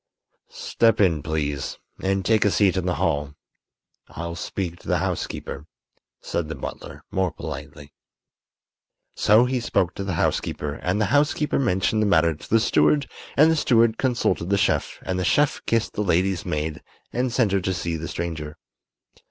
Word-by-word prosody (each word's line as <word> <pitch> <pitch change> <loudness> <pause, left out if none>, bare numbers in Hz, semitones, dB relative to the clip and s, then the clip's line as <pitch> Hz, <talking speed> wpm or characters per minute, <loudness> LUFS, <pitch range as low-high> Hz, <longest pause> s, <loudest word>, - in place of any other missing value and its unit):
"Step 115 -1 +1
in, 85 -7 +3
please, 75 -3 -3 0.2
and 95 0 0
take 110 -2 +3
a 105 - +4
seat 95 +2 +3
in 95 -1 -1
the 90 - +1
hall. 75 -2 -1 0.7
I'll 85 +1 -6
speak 85 0 -4
to - - -16
the - - +2
housekeeper," 70 +3 -4 0.5
said 85 -3 -3
the - - -4
butler, - - -8
more 95 -2 0
politely. 70 0 -8 1.2
So 110 +4 +4
he 130 0 0
spoke 95 -6 0
to 100 - -5
the 95 -3 -2
housekeeper 75 -2 -1
and 90 +6 -2
the 105 - +2
housekeeper 145 0 +2
mentioned 110 -2 +1
the 105 - +2
matter 85 -4 +4
to 75 - -13
the 115 - +4
steward 140 +5 +3 0.3
and 155 +3 +6
the - - +3
steward 115 -6 +3
consulted 105 - 0
the 100 - +3
chef 80 -8 0
and 90 0 -2
the - - 0
chef 145 +10 +2
kissed 115 -1 +1
the - - -2
lady's 95 -1 +1
maid 75 +1 -2 0.3
and 125 +1 0
sent 115 -4 +2
her 100 -1 +2
to 95 - -1
see 85 -2 -2
the 80 +1 -5
stranger. 80 -3 -5
95 Hz, 170 wpm, -24 LUFS, 80-110 Hz, 1.2 s, and